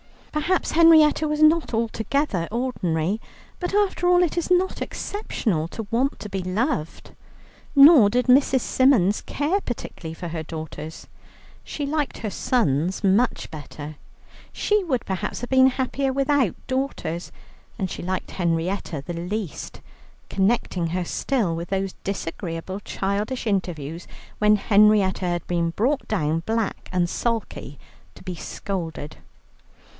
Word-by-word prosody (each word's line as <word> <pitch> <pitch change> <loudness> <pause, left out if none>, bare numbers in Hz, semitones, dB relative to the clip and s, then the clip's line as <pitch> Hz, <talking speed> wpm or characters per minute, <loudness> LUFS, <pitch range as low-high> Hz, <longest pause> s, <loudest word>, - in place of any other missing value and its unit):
Perhaps 320 +5 0
Henrietta 315 -2 +6
was 300 0 +1
not 315 -3 +4
altogether 225 - -1
ordinary, 210 -6 -1 0.4
but 355 - -3
after 395 -3 +2
all 355 0 +5
it 345 - -1
is 345 - -1
not 365 +1 +2
exceptional 215 - -2
to 225 +5 -6
want 255 +4 +1
to 210 - -6
be 195 -1 -3
loved. 185 - -2 0.6
Nor 280 -6 +9
did 250 +4 +1
Mrs. 260 0 +4
Symons 230 -7 +3
care 310 +8 0
particularly 180 - -6
for 175 0 -6
her 165 -1 -4
daughters; 155 0 -7 0.6
she 290 - -4
liked 295 0 -2
her 215 - -3
sons 180 - 0
much 200 +5 +2
better, 150 -1 -8 0.5
she 420 -1 +1
would 260 -8 -1
perhaps 195 +4 -3
have 245 - -5
been 260 0 +6
happier 265 +1 0
without 275 - +1
daughters; 260 -11 -3 0.5
and 190 -5 -2
she - - -5
liked 185 +1 -3
Henrietta 170 -3 -1
the 175 - -4
least, 180 +1 -5 0.5
connecting 190 -3 +1
her 180 +2 -1
still 215 -5 0
with 170 +1 -5
those 195 -1 -1
disagreeable 185 -1 -4
childish 205 +6 -2
interviews 175 -6 -2 0.3
when 210 0 +5
Henrietta 205 -2 +4
had 175 -2 -1
been 170 -1 0
brought 255 - 0
down, 160 -6 0
black 225 -1 -2
and 180 -1 +1
sulky, 225 - -3 0.4
to - - -14
be 185 -1 -4
scolded. 165 -3 -5
210 Hz, 135 wpm, -24 LUFS, 175-265 Hz, 0.6 s, Nor